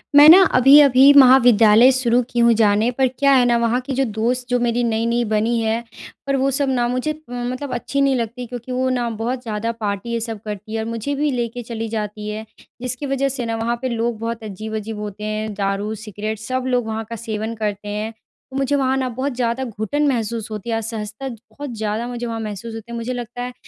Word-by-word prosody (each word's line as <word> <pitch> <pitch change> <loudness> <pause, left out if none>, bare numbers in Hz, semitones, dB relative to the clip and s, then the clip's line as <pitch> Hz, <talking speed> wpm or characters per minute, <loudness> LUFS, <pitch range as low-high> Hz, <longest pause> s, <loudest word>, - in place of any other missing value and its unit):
मैं 290 +1 +10
ना 360 +4 +10 0.2
अभी-अभी 270 0 +7
महाविद्यालय 245 -3 +7
शुरू 250 -2 +2
की 240 - -2
हूँ 235 0 +5
जाने। 215 0 +3
पर 265 -1 +3
क्या 275 +2 +1
है 255 -2 +5
ना, 240 -1 +3
वहाँ 235 +1 +1
की 270 +2 -5
जो 270 - +2
दोस्त 240 +3 -2
जो 245 0 +2
मेरी 240 0 0
नई-नई 235 +1 0
बनी 220 +2 +1
है, 225 +1 -1 0.4
पर 275 - +1
वो 270 0 +1
सब 280 -2 0
ना 245 -2 +1
मुझे 255 +5 -1
अ, - - -5 0.2
मतलब 250 +3 -4
अच्छी 280 +3 -2
नहीं 275 -1 +3
लगती 240 +1 -3
क्योंकि 245 +1 -7
वो 255 +1 0
ना 245 -2 -1
बहुत 245 +2 -2
ज़्यादा 225 0 -2
पार्टी 205 +1 -3
ये 230 - 0
सब 225 -1 -5
करती 210 0 -6
है 225 - -1
और 220 - -3
मुझे 230 +5 -3
भी 295 +1 0
लेके 240 -1 -3
चली 225 -1 -5
जाती 210 -1 -4
है, 215 +1 -5 0.4
जिसकी 255 +3 -4
वजह 275 0 0
से 245 - -3
ना 230 0 -2
वहाँ 230 +1 -1
पे 260 - -2
लोग 230 -1 -2
बहुत 230 0 -4
अजीब-अजीब 215 +1 -6
होते 210 0 -7
हैं, 215 0 -3
दारू, 200 +1 -2
सिगरेट, 215 0 -5
सब 255 +4 -3
लोग 250 -2 +1
वहाँ 220 0 -3
का 230 - -4
सेवन 220 0 -4
करते 210 -2 -4
हैं, 210 +2 -3
तो 245 +4 -14
मुझे 275 +1 +1
वहाँ 265 -1 +1
ना 260 -1 -1
बहुत 260 +3 -3
ज़्यादा 245 +1 -1
घुटन 235 +6 -1
महसूस 230 -4 -2
होती 215 +2 -6
है, 230 - 0
असहजता 220 +2 -5
ज 235 - -8
बहुत 285 -4 -7
ज़्यादा 215 +2 -2
मुझे 245 -1 -5
वहाँ 230 -1 -4
महसूस 215 +1 -6
होती 225 +1 -9
है। - - -5
मुझे 235 +2 -3
लगता 245 0 -6
है, 250 0 -5
235 Hz, 230 wpm, -20 LUFS, 220-255 Hz, 0.4 s, मैं